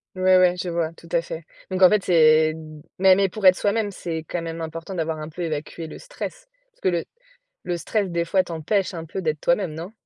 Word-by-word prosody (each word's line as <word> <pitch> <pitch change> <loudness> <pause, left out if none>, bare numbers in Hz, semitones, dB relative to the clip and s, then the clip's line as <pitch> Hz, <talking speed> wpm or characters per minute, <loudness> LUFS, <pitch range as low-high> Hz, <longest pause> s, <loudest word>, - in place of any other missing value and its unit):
Ouais, 185 0 +4
ouais, 180 -1 +5
je 180 - -4
vois, 170 -1 -1
tout 170 - -16
à 170 -1 +2
fait. 165 0 -7 0.3
Donc 185 0 -2
en 185 - +9
fait, 210 0 +2
c'est 155 -2 +5
d 155 -1 -11 0.2
mais 190 -1 +7
mais 195 0 +2
pour 195 +1 +1
être 185 - +8
soi-même, 205 +1 0
c'est 170 -4 -4
quand 175 - -3
même 165 0 -5
important 165 +3 -6
d'avoir 160 -3 -2
un 155 0 -6
peu 165 +3 -8
évacué 160 0 -4
le - - -9
stress - - -8 0.2
parce - - -35
que - - +2
le 170 -2 -1 0.6
le 175 - -2
stress, 200 +3 -1
des 170 -1 0
fois, 185 +2 +2
t'empêche 175 +5 -1
un 165 -2 -5
peu 180 +4 -5
d'être 155 -3 -1
toi-même, 175 -1 +1
non? 165 +5 -7
170 Hz, 240 wpm, -23 LUFS, 160-190 Hz, 0.6 s, en